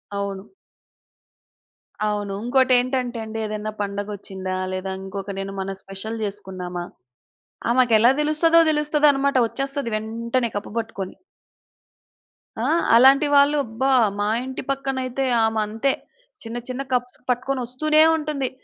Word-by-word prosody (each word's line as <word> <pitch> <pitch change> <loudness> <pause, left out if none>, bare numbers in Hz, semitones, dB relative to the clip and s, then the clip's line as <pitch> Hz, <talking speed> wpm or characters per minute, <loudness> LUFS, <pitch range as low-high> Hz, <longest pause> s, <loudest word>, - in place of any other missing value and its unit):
అవును. 200 0 -4 1.6
అవును. 205 -1 -2
ఇంకోటేంటంటే 255 0 +2
అండి 220 0 -6
ఏదైనా 215 0 -4
పండగొచ్చిందా? 200 -2 -4 0.2
లేదా 185 +1 -3
ఇంకొక 195 +1 -6
నేను 195 0 -5
మన 195 0 -3
స్పెషల్ 195 +4 -5
చేసుకున్నామా! 185 -3 -5 0.9
ఆమెకెలా 240 -2 +5
తెలుస్తదో 310 +2 +4
తెలుస్తదనమాట 295 -2 +2
వచ్చేస్తది 275 +1 -3
వెంటనే 230 +3 -1
కప్పు 205 - -4
పట్టుకొని. 200 -4 -5 1.5
ఆ! - - +1 0.3
అలాంటి 270 +5 +6
వాళ్ళు 285 +1 +5
అబ్బా! 230 +5 -1 0.3
మా 205 - +1 0.2
ఇంటి 260 0 -5
పక్కనైతే 270 -1 -1 0.2
ఆమె 220 0 0
అంతే. 225 +6 0 0.5
చిన్న 230 +1 -6
చిన్న 255 +1 -3
కప్స్ 250 0 -1
పట్టుకొని 255 +2 0
వస్తూనే 305 +6 +2 0.2
ఉంటుంది. 295 -4 -2
235 Hz, 110 wpm, -23 LUFS, 205-270 Hz, 1.6 s, అలాంటి